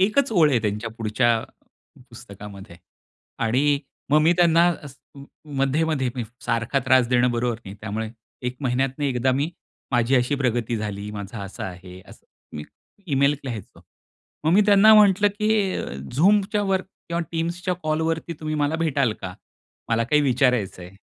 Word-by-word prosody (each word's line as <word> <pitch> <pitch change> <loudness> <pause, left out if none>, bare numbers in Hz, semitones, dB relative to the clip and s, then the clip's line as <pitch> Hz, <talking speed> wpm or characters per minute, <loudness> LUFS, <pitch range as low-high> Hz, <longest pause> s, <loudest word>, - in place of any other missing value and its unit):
एकच 220 +7 +2
ओळ 165 -7 +5
आहे 130 - +3
त्यांच्या 105 +2 -2
पुढच्या 115 +2 +1 0.8
पुस्तकामध्ये 100 -5 -11 0.7
आणि 140 +5 +2 0.3
मग 150 - +6
मी 165 +2 +5
त्यांना 170 -1 +4 0.2
अ, 145 - -8 0.7
मध्ये-मध्ये 135 0 +1
मी 125 -3 -3 0.2
सारखा 115 +3 0
त्रास 130 -2 +4
देणं 125 0 +3
बरोबर 120 -1 -1
नाही 95 +1 -8
त्यामुळे 110 +1 -4 0.4
1 125 +1 -3
महिन्यातनं 135 +2 -1
एकदा 130 -1 +1
मी, 140 +5 -1 0.4
माझी 120 +2 +2
अशी 125 +3 +1
प्रगती 120 -4 -1
झाली 105 -1 -5
माझा 105 +1 -7
असा 100 - -7
आहे 90 0 -11
असं - - -17 0.3
मी 75 - -6 0.5
ईमेल 140 +2 +3
लिहायचो. 115 -7 -7 0.6
मग 160 - +3
मी 195 - +6
त्यांना 210 +1 +7
म्हंटलं, 205 -1 +5
की 210 -1 0
अ, - - -3 0.3
Zoomच्या 205 +5 +3
वर 190 -1 +1 0.3
किंवा 170 0 -1
Teamsच्या 175 +3 -2
कॉलवरती 160 +2 -1
तुम्ही 155 -1 -3
मला 145 +1 0
भेटाल 140 -8 +1
का? 90 -1 -6 0.5
मला 115 0 +1
काही 150 +4 +2
विचारायचं 125 -8 +1
आहे. 90 +2 -12
135 Hz, 150 wpm, -23 LUFS, 115-165 Hz, 0.8 s, त्यांना